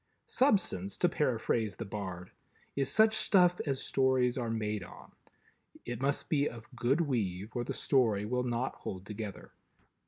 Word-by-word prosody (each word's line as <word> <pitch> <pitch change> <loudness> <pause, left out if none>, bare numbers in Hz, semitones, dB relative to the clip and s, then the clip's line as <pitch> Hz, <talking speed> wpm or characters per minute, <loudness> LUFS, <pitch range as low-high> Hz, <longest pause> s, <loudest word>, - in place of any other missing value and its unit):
Substance, 185 - +2
to 175 - +3
paraphrase 115 -8 0
the 115 - -5
Bard, 95 -3 -6 0.4
is 135 -1 +1
such 220 0 +5
stuff 180 -4 +4
as 135 -1 0
Stories 130 -2 +2
are 120 -3 -2
made 105 -3 -2
on. - - -13 0.7
It 120 +1 -5
must 140 +1 0
be 145 -2 +2
of 115 +1 -12
good 125 +7 +2
weave, 105 - -2
or 120 - 0
the - - -4
story 110 -7 +2
will 125 +3 0
not 125 +1 -1
hold 95 0 -6
together. 105 -1 -7
120 Hz, 155 wpm, -32 LUFS, 105-140 Hz, 0.7 s, such